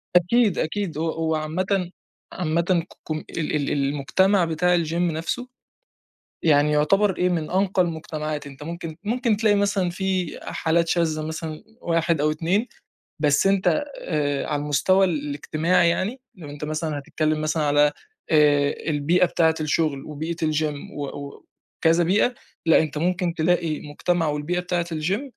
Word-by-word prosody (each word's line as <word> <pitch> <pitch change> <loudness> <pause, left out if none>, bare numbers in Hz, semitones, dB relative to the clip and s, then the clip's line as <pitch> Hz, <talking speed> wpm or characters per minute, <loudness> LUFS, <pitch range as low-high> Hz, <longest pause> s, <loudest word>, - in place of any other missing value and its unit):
أكيد، 200 +4 +4
أكيد 170 -1 -2
هو 165 +1 0
هو 160 0 -1
عامةً، 180 +4 -1 0.4
عامةً 170 -2 0 0.3
ك - - -15
كم 155 -1 -3
ال 155 -2 -2
ال 145 -2 0
المجتمع 150 +7 +2
بتاع 175 +2 +2
الgym 160 0 -4
نفسه 170 +8 -1 0.9
يعني 150 -2 +4
يعتبر 190 +6 +3
إيه، 180 - +2
من 165 -3 -1
أنقى 190 0 +2
المجتمعات، 155 -3 -3
أنت 140 +1 -11
ممكن 165 0 -6
ممكن 230 0 +1
تلاقي 215 -1 +3
مثلًا 200 -2 +1
في 185 -2 -2
حالات 165 +1 0
شاذة 160 -3 0
مثلًا 160 0 -5 0.2
واحد 165 -2 +1
أو 155 +1 +2
اتنين، 175 +9 0 0.5
بس 145 +3 +3
أنت 195 0 +2 0.3
آآ 145 -4 -1
على 145 -1 -1
المستوى 185 +7 +3
ال 150 -5 -2
الاجتماعي 165 +4 +2
يعني، 215 +9 -2
لو 165 -7 -10
أنت 145 +1 -8
مثلًا 155 0 -2
هتتكلم 155 +2 -1
مثلًا 155 0 0
على 145 0 +4 0.4
آآ 145 -2 +4 0.2
البيئة 160 +5 +3
بتاعة 165 -2 +2
الشغل، 150 -2 0
وبيئة 155 +3 -4
الgym 155 -2 -2
و 145 - -2
و 140 0 -9 0.4
وكذا 165 +1 +4
بيئة، 200 +8 +2 0.3
لأ، 165 - +6
أنت 155 -1 -3
ممكن 175 +2 0
تلاقي 165 -1 0
مجتمع 165 +2 0
والبيئة 150 +4 -1
بتاعة 180 -1 -1
الgym 165 - -1
160 Hz, 150 wpm, -23 LUFS, 150-180 Hz, 0.9 s, لأ